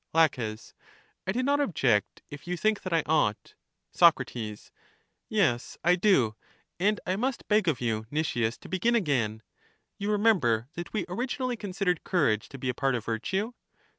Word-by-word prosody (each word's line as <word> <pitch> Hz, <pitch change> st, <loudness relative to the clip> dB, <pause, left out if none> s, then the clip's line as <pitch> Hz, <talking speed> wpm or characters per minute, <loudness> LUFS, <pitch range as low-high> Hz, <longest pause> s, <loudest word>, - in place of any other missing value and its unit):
La, 165 Hz, 0 st, +7 dB, 1.0 s
I -, -, +2 dB
do 250 Hz, +5 st, -1 dB
not 285 Hz, +2 st, +2 dB
object 135 Hz, -, +1 dB
if 145 Hz, +3 st, -10 dB
you 180 Hz, 0 st, -2 dB
think 215 Hz, +3 st, +1 dB
that 185 Hz, -, -5 dB
I 165 Hz, -2 st, +2 dB
ought. 150 Hz, -9 st, 0 dB, 0.4 s
Soc, -, -, +6 dB, 1.1 s
Yes, 175 Hz, -, +1 dB
I 175 Hz, +2 st, +5 dB
do; 170 Hz, -, +3 dB, 0.4 s
and 210 Hz, +3 st, +2 dB
I 185 Hz, -, 0 dB
must 250 Hz, +5 st, -2 dB
beg 210 Hz, -3 st, +3 dB
of 150 Hz, -7 st, +1 dB
you, 110 Hz, -2 st, -2 dB
Nicias, 120 Hz, -6 st, -1 dB
to -, -, -11 dB
begin 210 Hz, +6 st, +1 dB
again. 120 Hz, -, 0 dB, 0.6 s
You 200 Hz, +1 st, -2 dB
remember 160 Hz, -, +2 dB
that 175 Hz, 0 st, -6 dB
we 215 Hz, -, -2 dB
originally 250 Hz, +6 st, -2 dB
con 205 Hz, -4 st, -7 dB
sidered 180 Hz, -3 st, 0 dB
courage 140 Hz, -, +1 dB
to 135 Hz, -, -9 dB
be 130 Hz, -, -5 dB
a -, -, 0 dB
part 135 Hz, +1 st, 0 dB
of 115 Hz, -3 st, -4 dB
virtue. 190 Hz, -, -2 dB
175 Hz, 165 wpm, -28 LUFS, -, 1.1 s, La